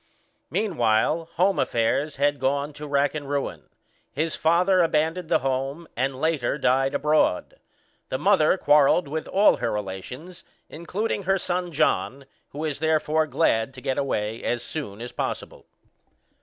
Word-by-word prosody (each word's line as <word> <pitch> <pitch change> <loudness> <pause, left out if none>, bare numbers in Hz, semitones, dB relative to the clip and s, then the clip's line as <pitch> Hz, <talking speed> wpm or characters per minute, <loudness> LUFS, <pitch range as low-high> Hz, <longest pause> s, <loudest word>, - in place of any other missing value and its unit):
Meanwhile 160 - +1
home 190 +3 +2
affairs 130 +6 0
had 145 +1 +1
gone 140 +3 -1
to 150 +1 -8
rack 140 0 +1
and 145 -3 -6
ruin. 140 -1 -3 0.4
His 155 +4 -2
father 180 +3 +3
abandoned 165 +1 0
the - - +4
home, 135 +5 -2
and 130 +2 -1
later 150 -4 0
died 135 -1 +1
abroad. 150 -10 +1 0.5
The 130 - -1
mother 190 0 +3
quarrelled 150 +1 +4
with 155 +2 -4
all 200 +2 +4
her - - -2
relations, 105 - -6 0.3
including 200 +6 -3
her 195 - +4
son 180 -1 -2
John; 140 -3 0 0.2
who - - -12
was 150 -2 -3
therefore 155 0 +1
glad 135 -3 +1
to - - -8
get 130 - -1
away 110 -5 -2
as 120 0 -1
soon 115 -10 -6
as 120 - -6
possible. - - -5
150 Hz, 145 wpm, -24 LUFS, 135-165 Hz, 0.5 s, the